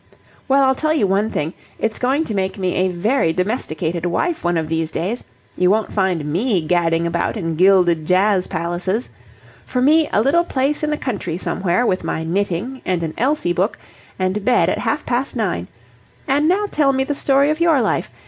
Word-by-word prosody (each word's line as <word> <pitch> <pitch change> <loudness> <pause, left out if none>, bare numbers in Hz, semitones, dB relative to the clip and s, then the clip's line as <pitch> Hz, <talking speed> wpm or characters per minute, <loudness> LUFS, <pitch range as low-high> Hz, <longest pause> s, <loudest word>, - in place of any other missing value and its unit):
"Well, 275 0 +4
I'll 265 0 +4
tell 310 +3 0
you 280 - +2
one 200 +3 +1
thing. 160 -4 -3 0.2
It's 225 -1 -2
going 270 +5 +1
to 220 - -4
make 190 -1 -2
me 185 -2 -1
a 185 +1 +1
very 185 +2 +1
domesticated 175 -4 -2
wife 180 - -1
one 175 -1 +1
of 160 -1 -1
these 160 0 -1
days. 200 +10 -3 0.3
You 180 0 +2
won't 215 +2 +1
find 185 -6 0
me 180 - 0
gadding 165 0 +1
about 170 +6 -1
in 165 -5 -2
gilded 175 -3 +3
jazz 185 0 +3
palaces! 180 +7 -2 0.5
For 250 - -3
me, 305 +4 +4
a 210 - +2
little 325 +7 +3
place 285 -2 -1
in 305 - -1
the 300 - -1
country 195 - -3
somewhere, 185 +4 0
with 185 -4 0
my 160 - -2
knitting 200 +8 -2
and 180 -2 -1
an 160 -1 -3
Elsie 260 -7 0
book, 190 +5 0 0.4
and 185 +2 -1
bed 250 +2 +3
at - - -1
half - - -1
past 255 +3 -1
nine! 190 - -2 0.6
And 290 +3 +2
now 390 +5 +2
tell 280 -3 +2
me 265 0 +1
the 290 - -2
story 280 +1 +2
of 310 - -2
your 335 -4 +4
life. - - 0
195 Hz, 195 wpm, -19 LUFS, 175-265 Hz, 0.6 s, Well